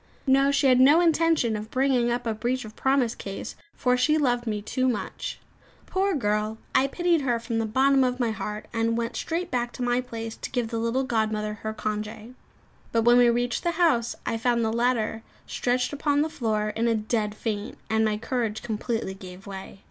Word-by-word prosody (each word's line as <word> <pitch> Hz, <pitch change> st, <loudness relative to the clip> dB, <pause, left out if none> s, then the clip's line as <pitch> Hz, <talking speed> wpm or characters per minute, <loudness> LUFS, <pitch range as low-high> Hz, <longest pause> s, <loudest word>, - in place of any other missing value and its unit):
No; 275 Hz, 0 st, +4 dB
she 280 Hz, 0 st, +2 dB
had 255 Hz, -1 st, +5 dB
no 285 Hz, +5 st, +7 dB
intention 330 Hz, -8 st, +3 dB
of 210 Hz, +1 st, -5 dB
bringing 255 Hz, -2 st, +2 dB
up 240 Hz, +1 st, -1 dB
a 225 Hz, -, 0 dB
breach 245 Hz, +3 st, -2 dB
of 215 Hz, -, -11 dB
promise 265 Hz, -3 st, +2 dB
case, 195 Hz, -4 st, -7 dB, 0.2 s
for 250 Hz, -1 st, +2 dB
she 295 Hz, +5 st, +3 dB
loved 245 Hz, -5 st, +1 dB
me 210 Hz, -1 st, -1 dB
too 255 Hz, +5 st, -1 dB
much. 235 Hz, -, -4 dB, 0.5 s
Poor 385 Hz, 0 st, 0 dB
girl; 215 Hz, -3 st, 0 dB, 0.2 s
I 270 Hz, -, +4 dB
pitied 345 Hz, +2 st, +1 dB
her 245 Hz, -4 st, 0 dB
from 230 Hz, 0 st, -2 dB
the 225 Hz, -, -1 dB
bottom 265 Hz, +4 st, +4 dB
of 250 Hz, 0 st, 0 dB
my 235 Hz, -3 st, +1 dB
heart, 210 Hz, +1 st, -5 dB
and 230 Hz, 0 st, +1 dB
went 235 Hz, 0 st, -2 dB
straight 340 Hz, +2 st, -3 dB
back 240 Hz, -1 st, -1 dB
to 250 Hz, -, -4 dB
my 245 Hz, +1 st, +2 dB
place 225 Hz, -2 st, -6 dB
to -, -, -6 dB
give 245 Hz, -4 st, -1 dB
the 230 Hz, -1 st, -2 dB
little 230 Hz, +4 st, 0 dB
godmother 215 Hz, -3 st, -1 dB
her 220 Hz, -, -3 dB
congé. 215 Hz, +2 st, -5 dB, 0.6 s
But 230 Hz, -1 st, +2 dB
when 240 Hz, +1 st, +6 dB
we 245 Hz, -1 st, +6 dB
reached 240 Hz, +1 st, 0 dB
the 345 Hz, -1 st, 0 dB
house, 315 Hz, -10 st, +2 dB
I 225 Hz, -, -1 dB
found 235 Hz, 0 st, +1 dB
the 220 Hz, -, 0 dB
latter 235 Hz, -2 st, 0 dB, 0.2 s
stretched 250 Hz, +2 st, -1 dB
upon 285 Hz, 0 st, +1 dB
the 315 Hz, -, -2 dB
floor 215 Hz, -7 st, -1 dB
in 225 Hz, +3 st, -1 dB
a 230 Hz, -, +3 dB
dead 215 Hz, -1 st, -1 dB
faint; 215 Hz, 0 st, -4 dB
and 220 Hz, 0 st, +2 dB
my 215 Hz, -1 st, +1 dB
courage 230 Hz, -1 st, -2 dB
completely 225 Hz, -2 st, -2 dB
gave 185 Hz, 0 st, -11 dB
way. 195 Hz, 0 st, -8 dB
235 Hz, 205 wpm, -26 LUFS, 220-260 Hz, 0.6 s, no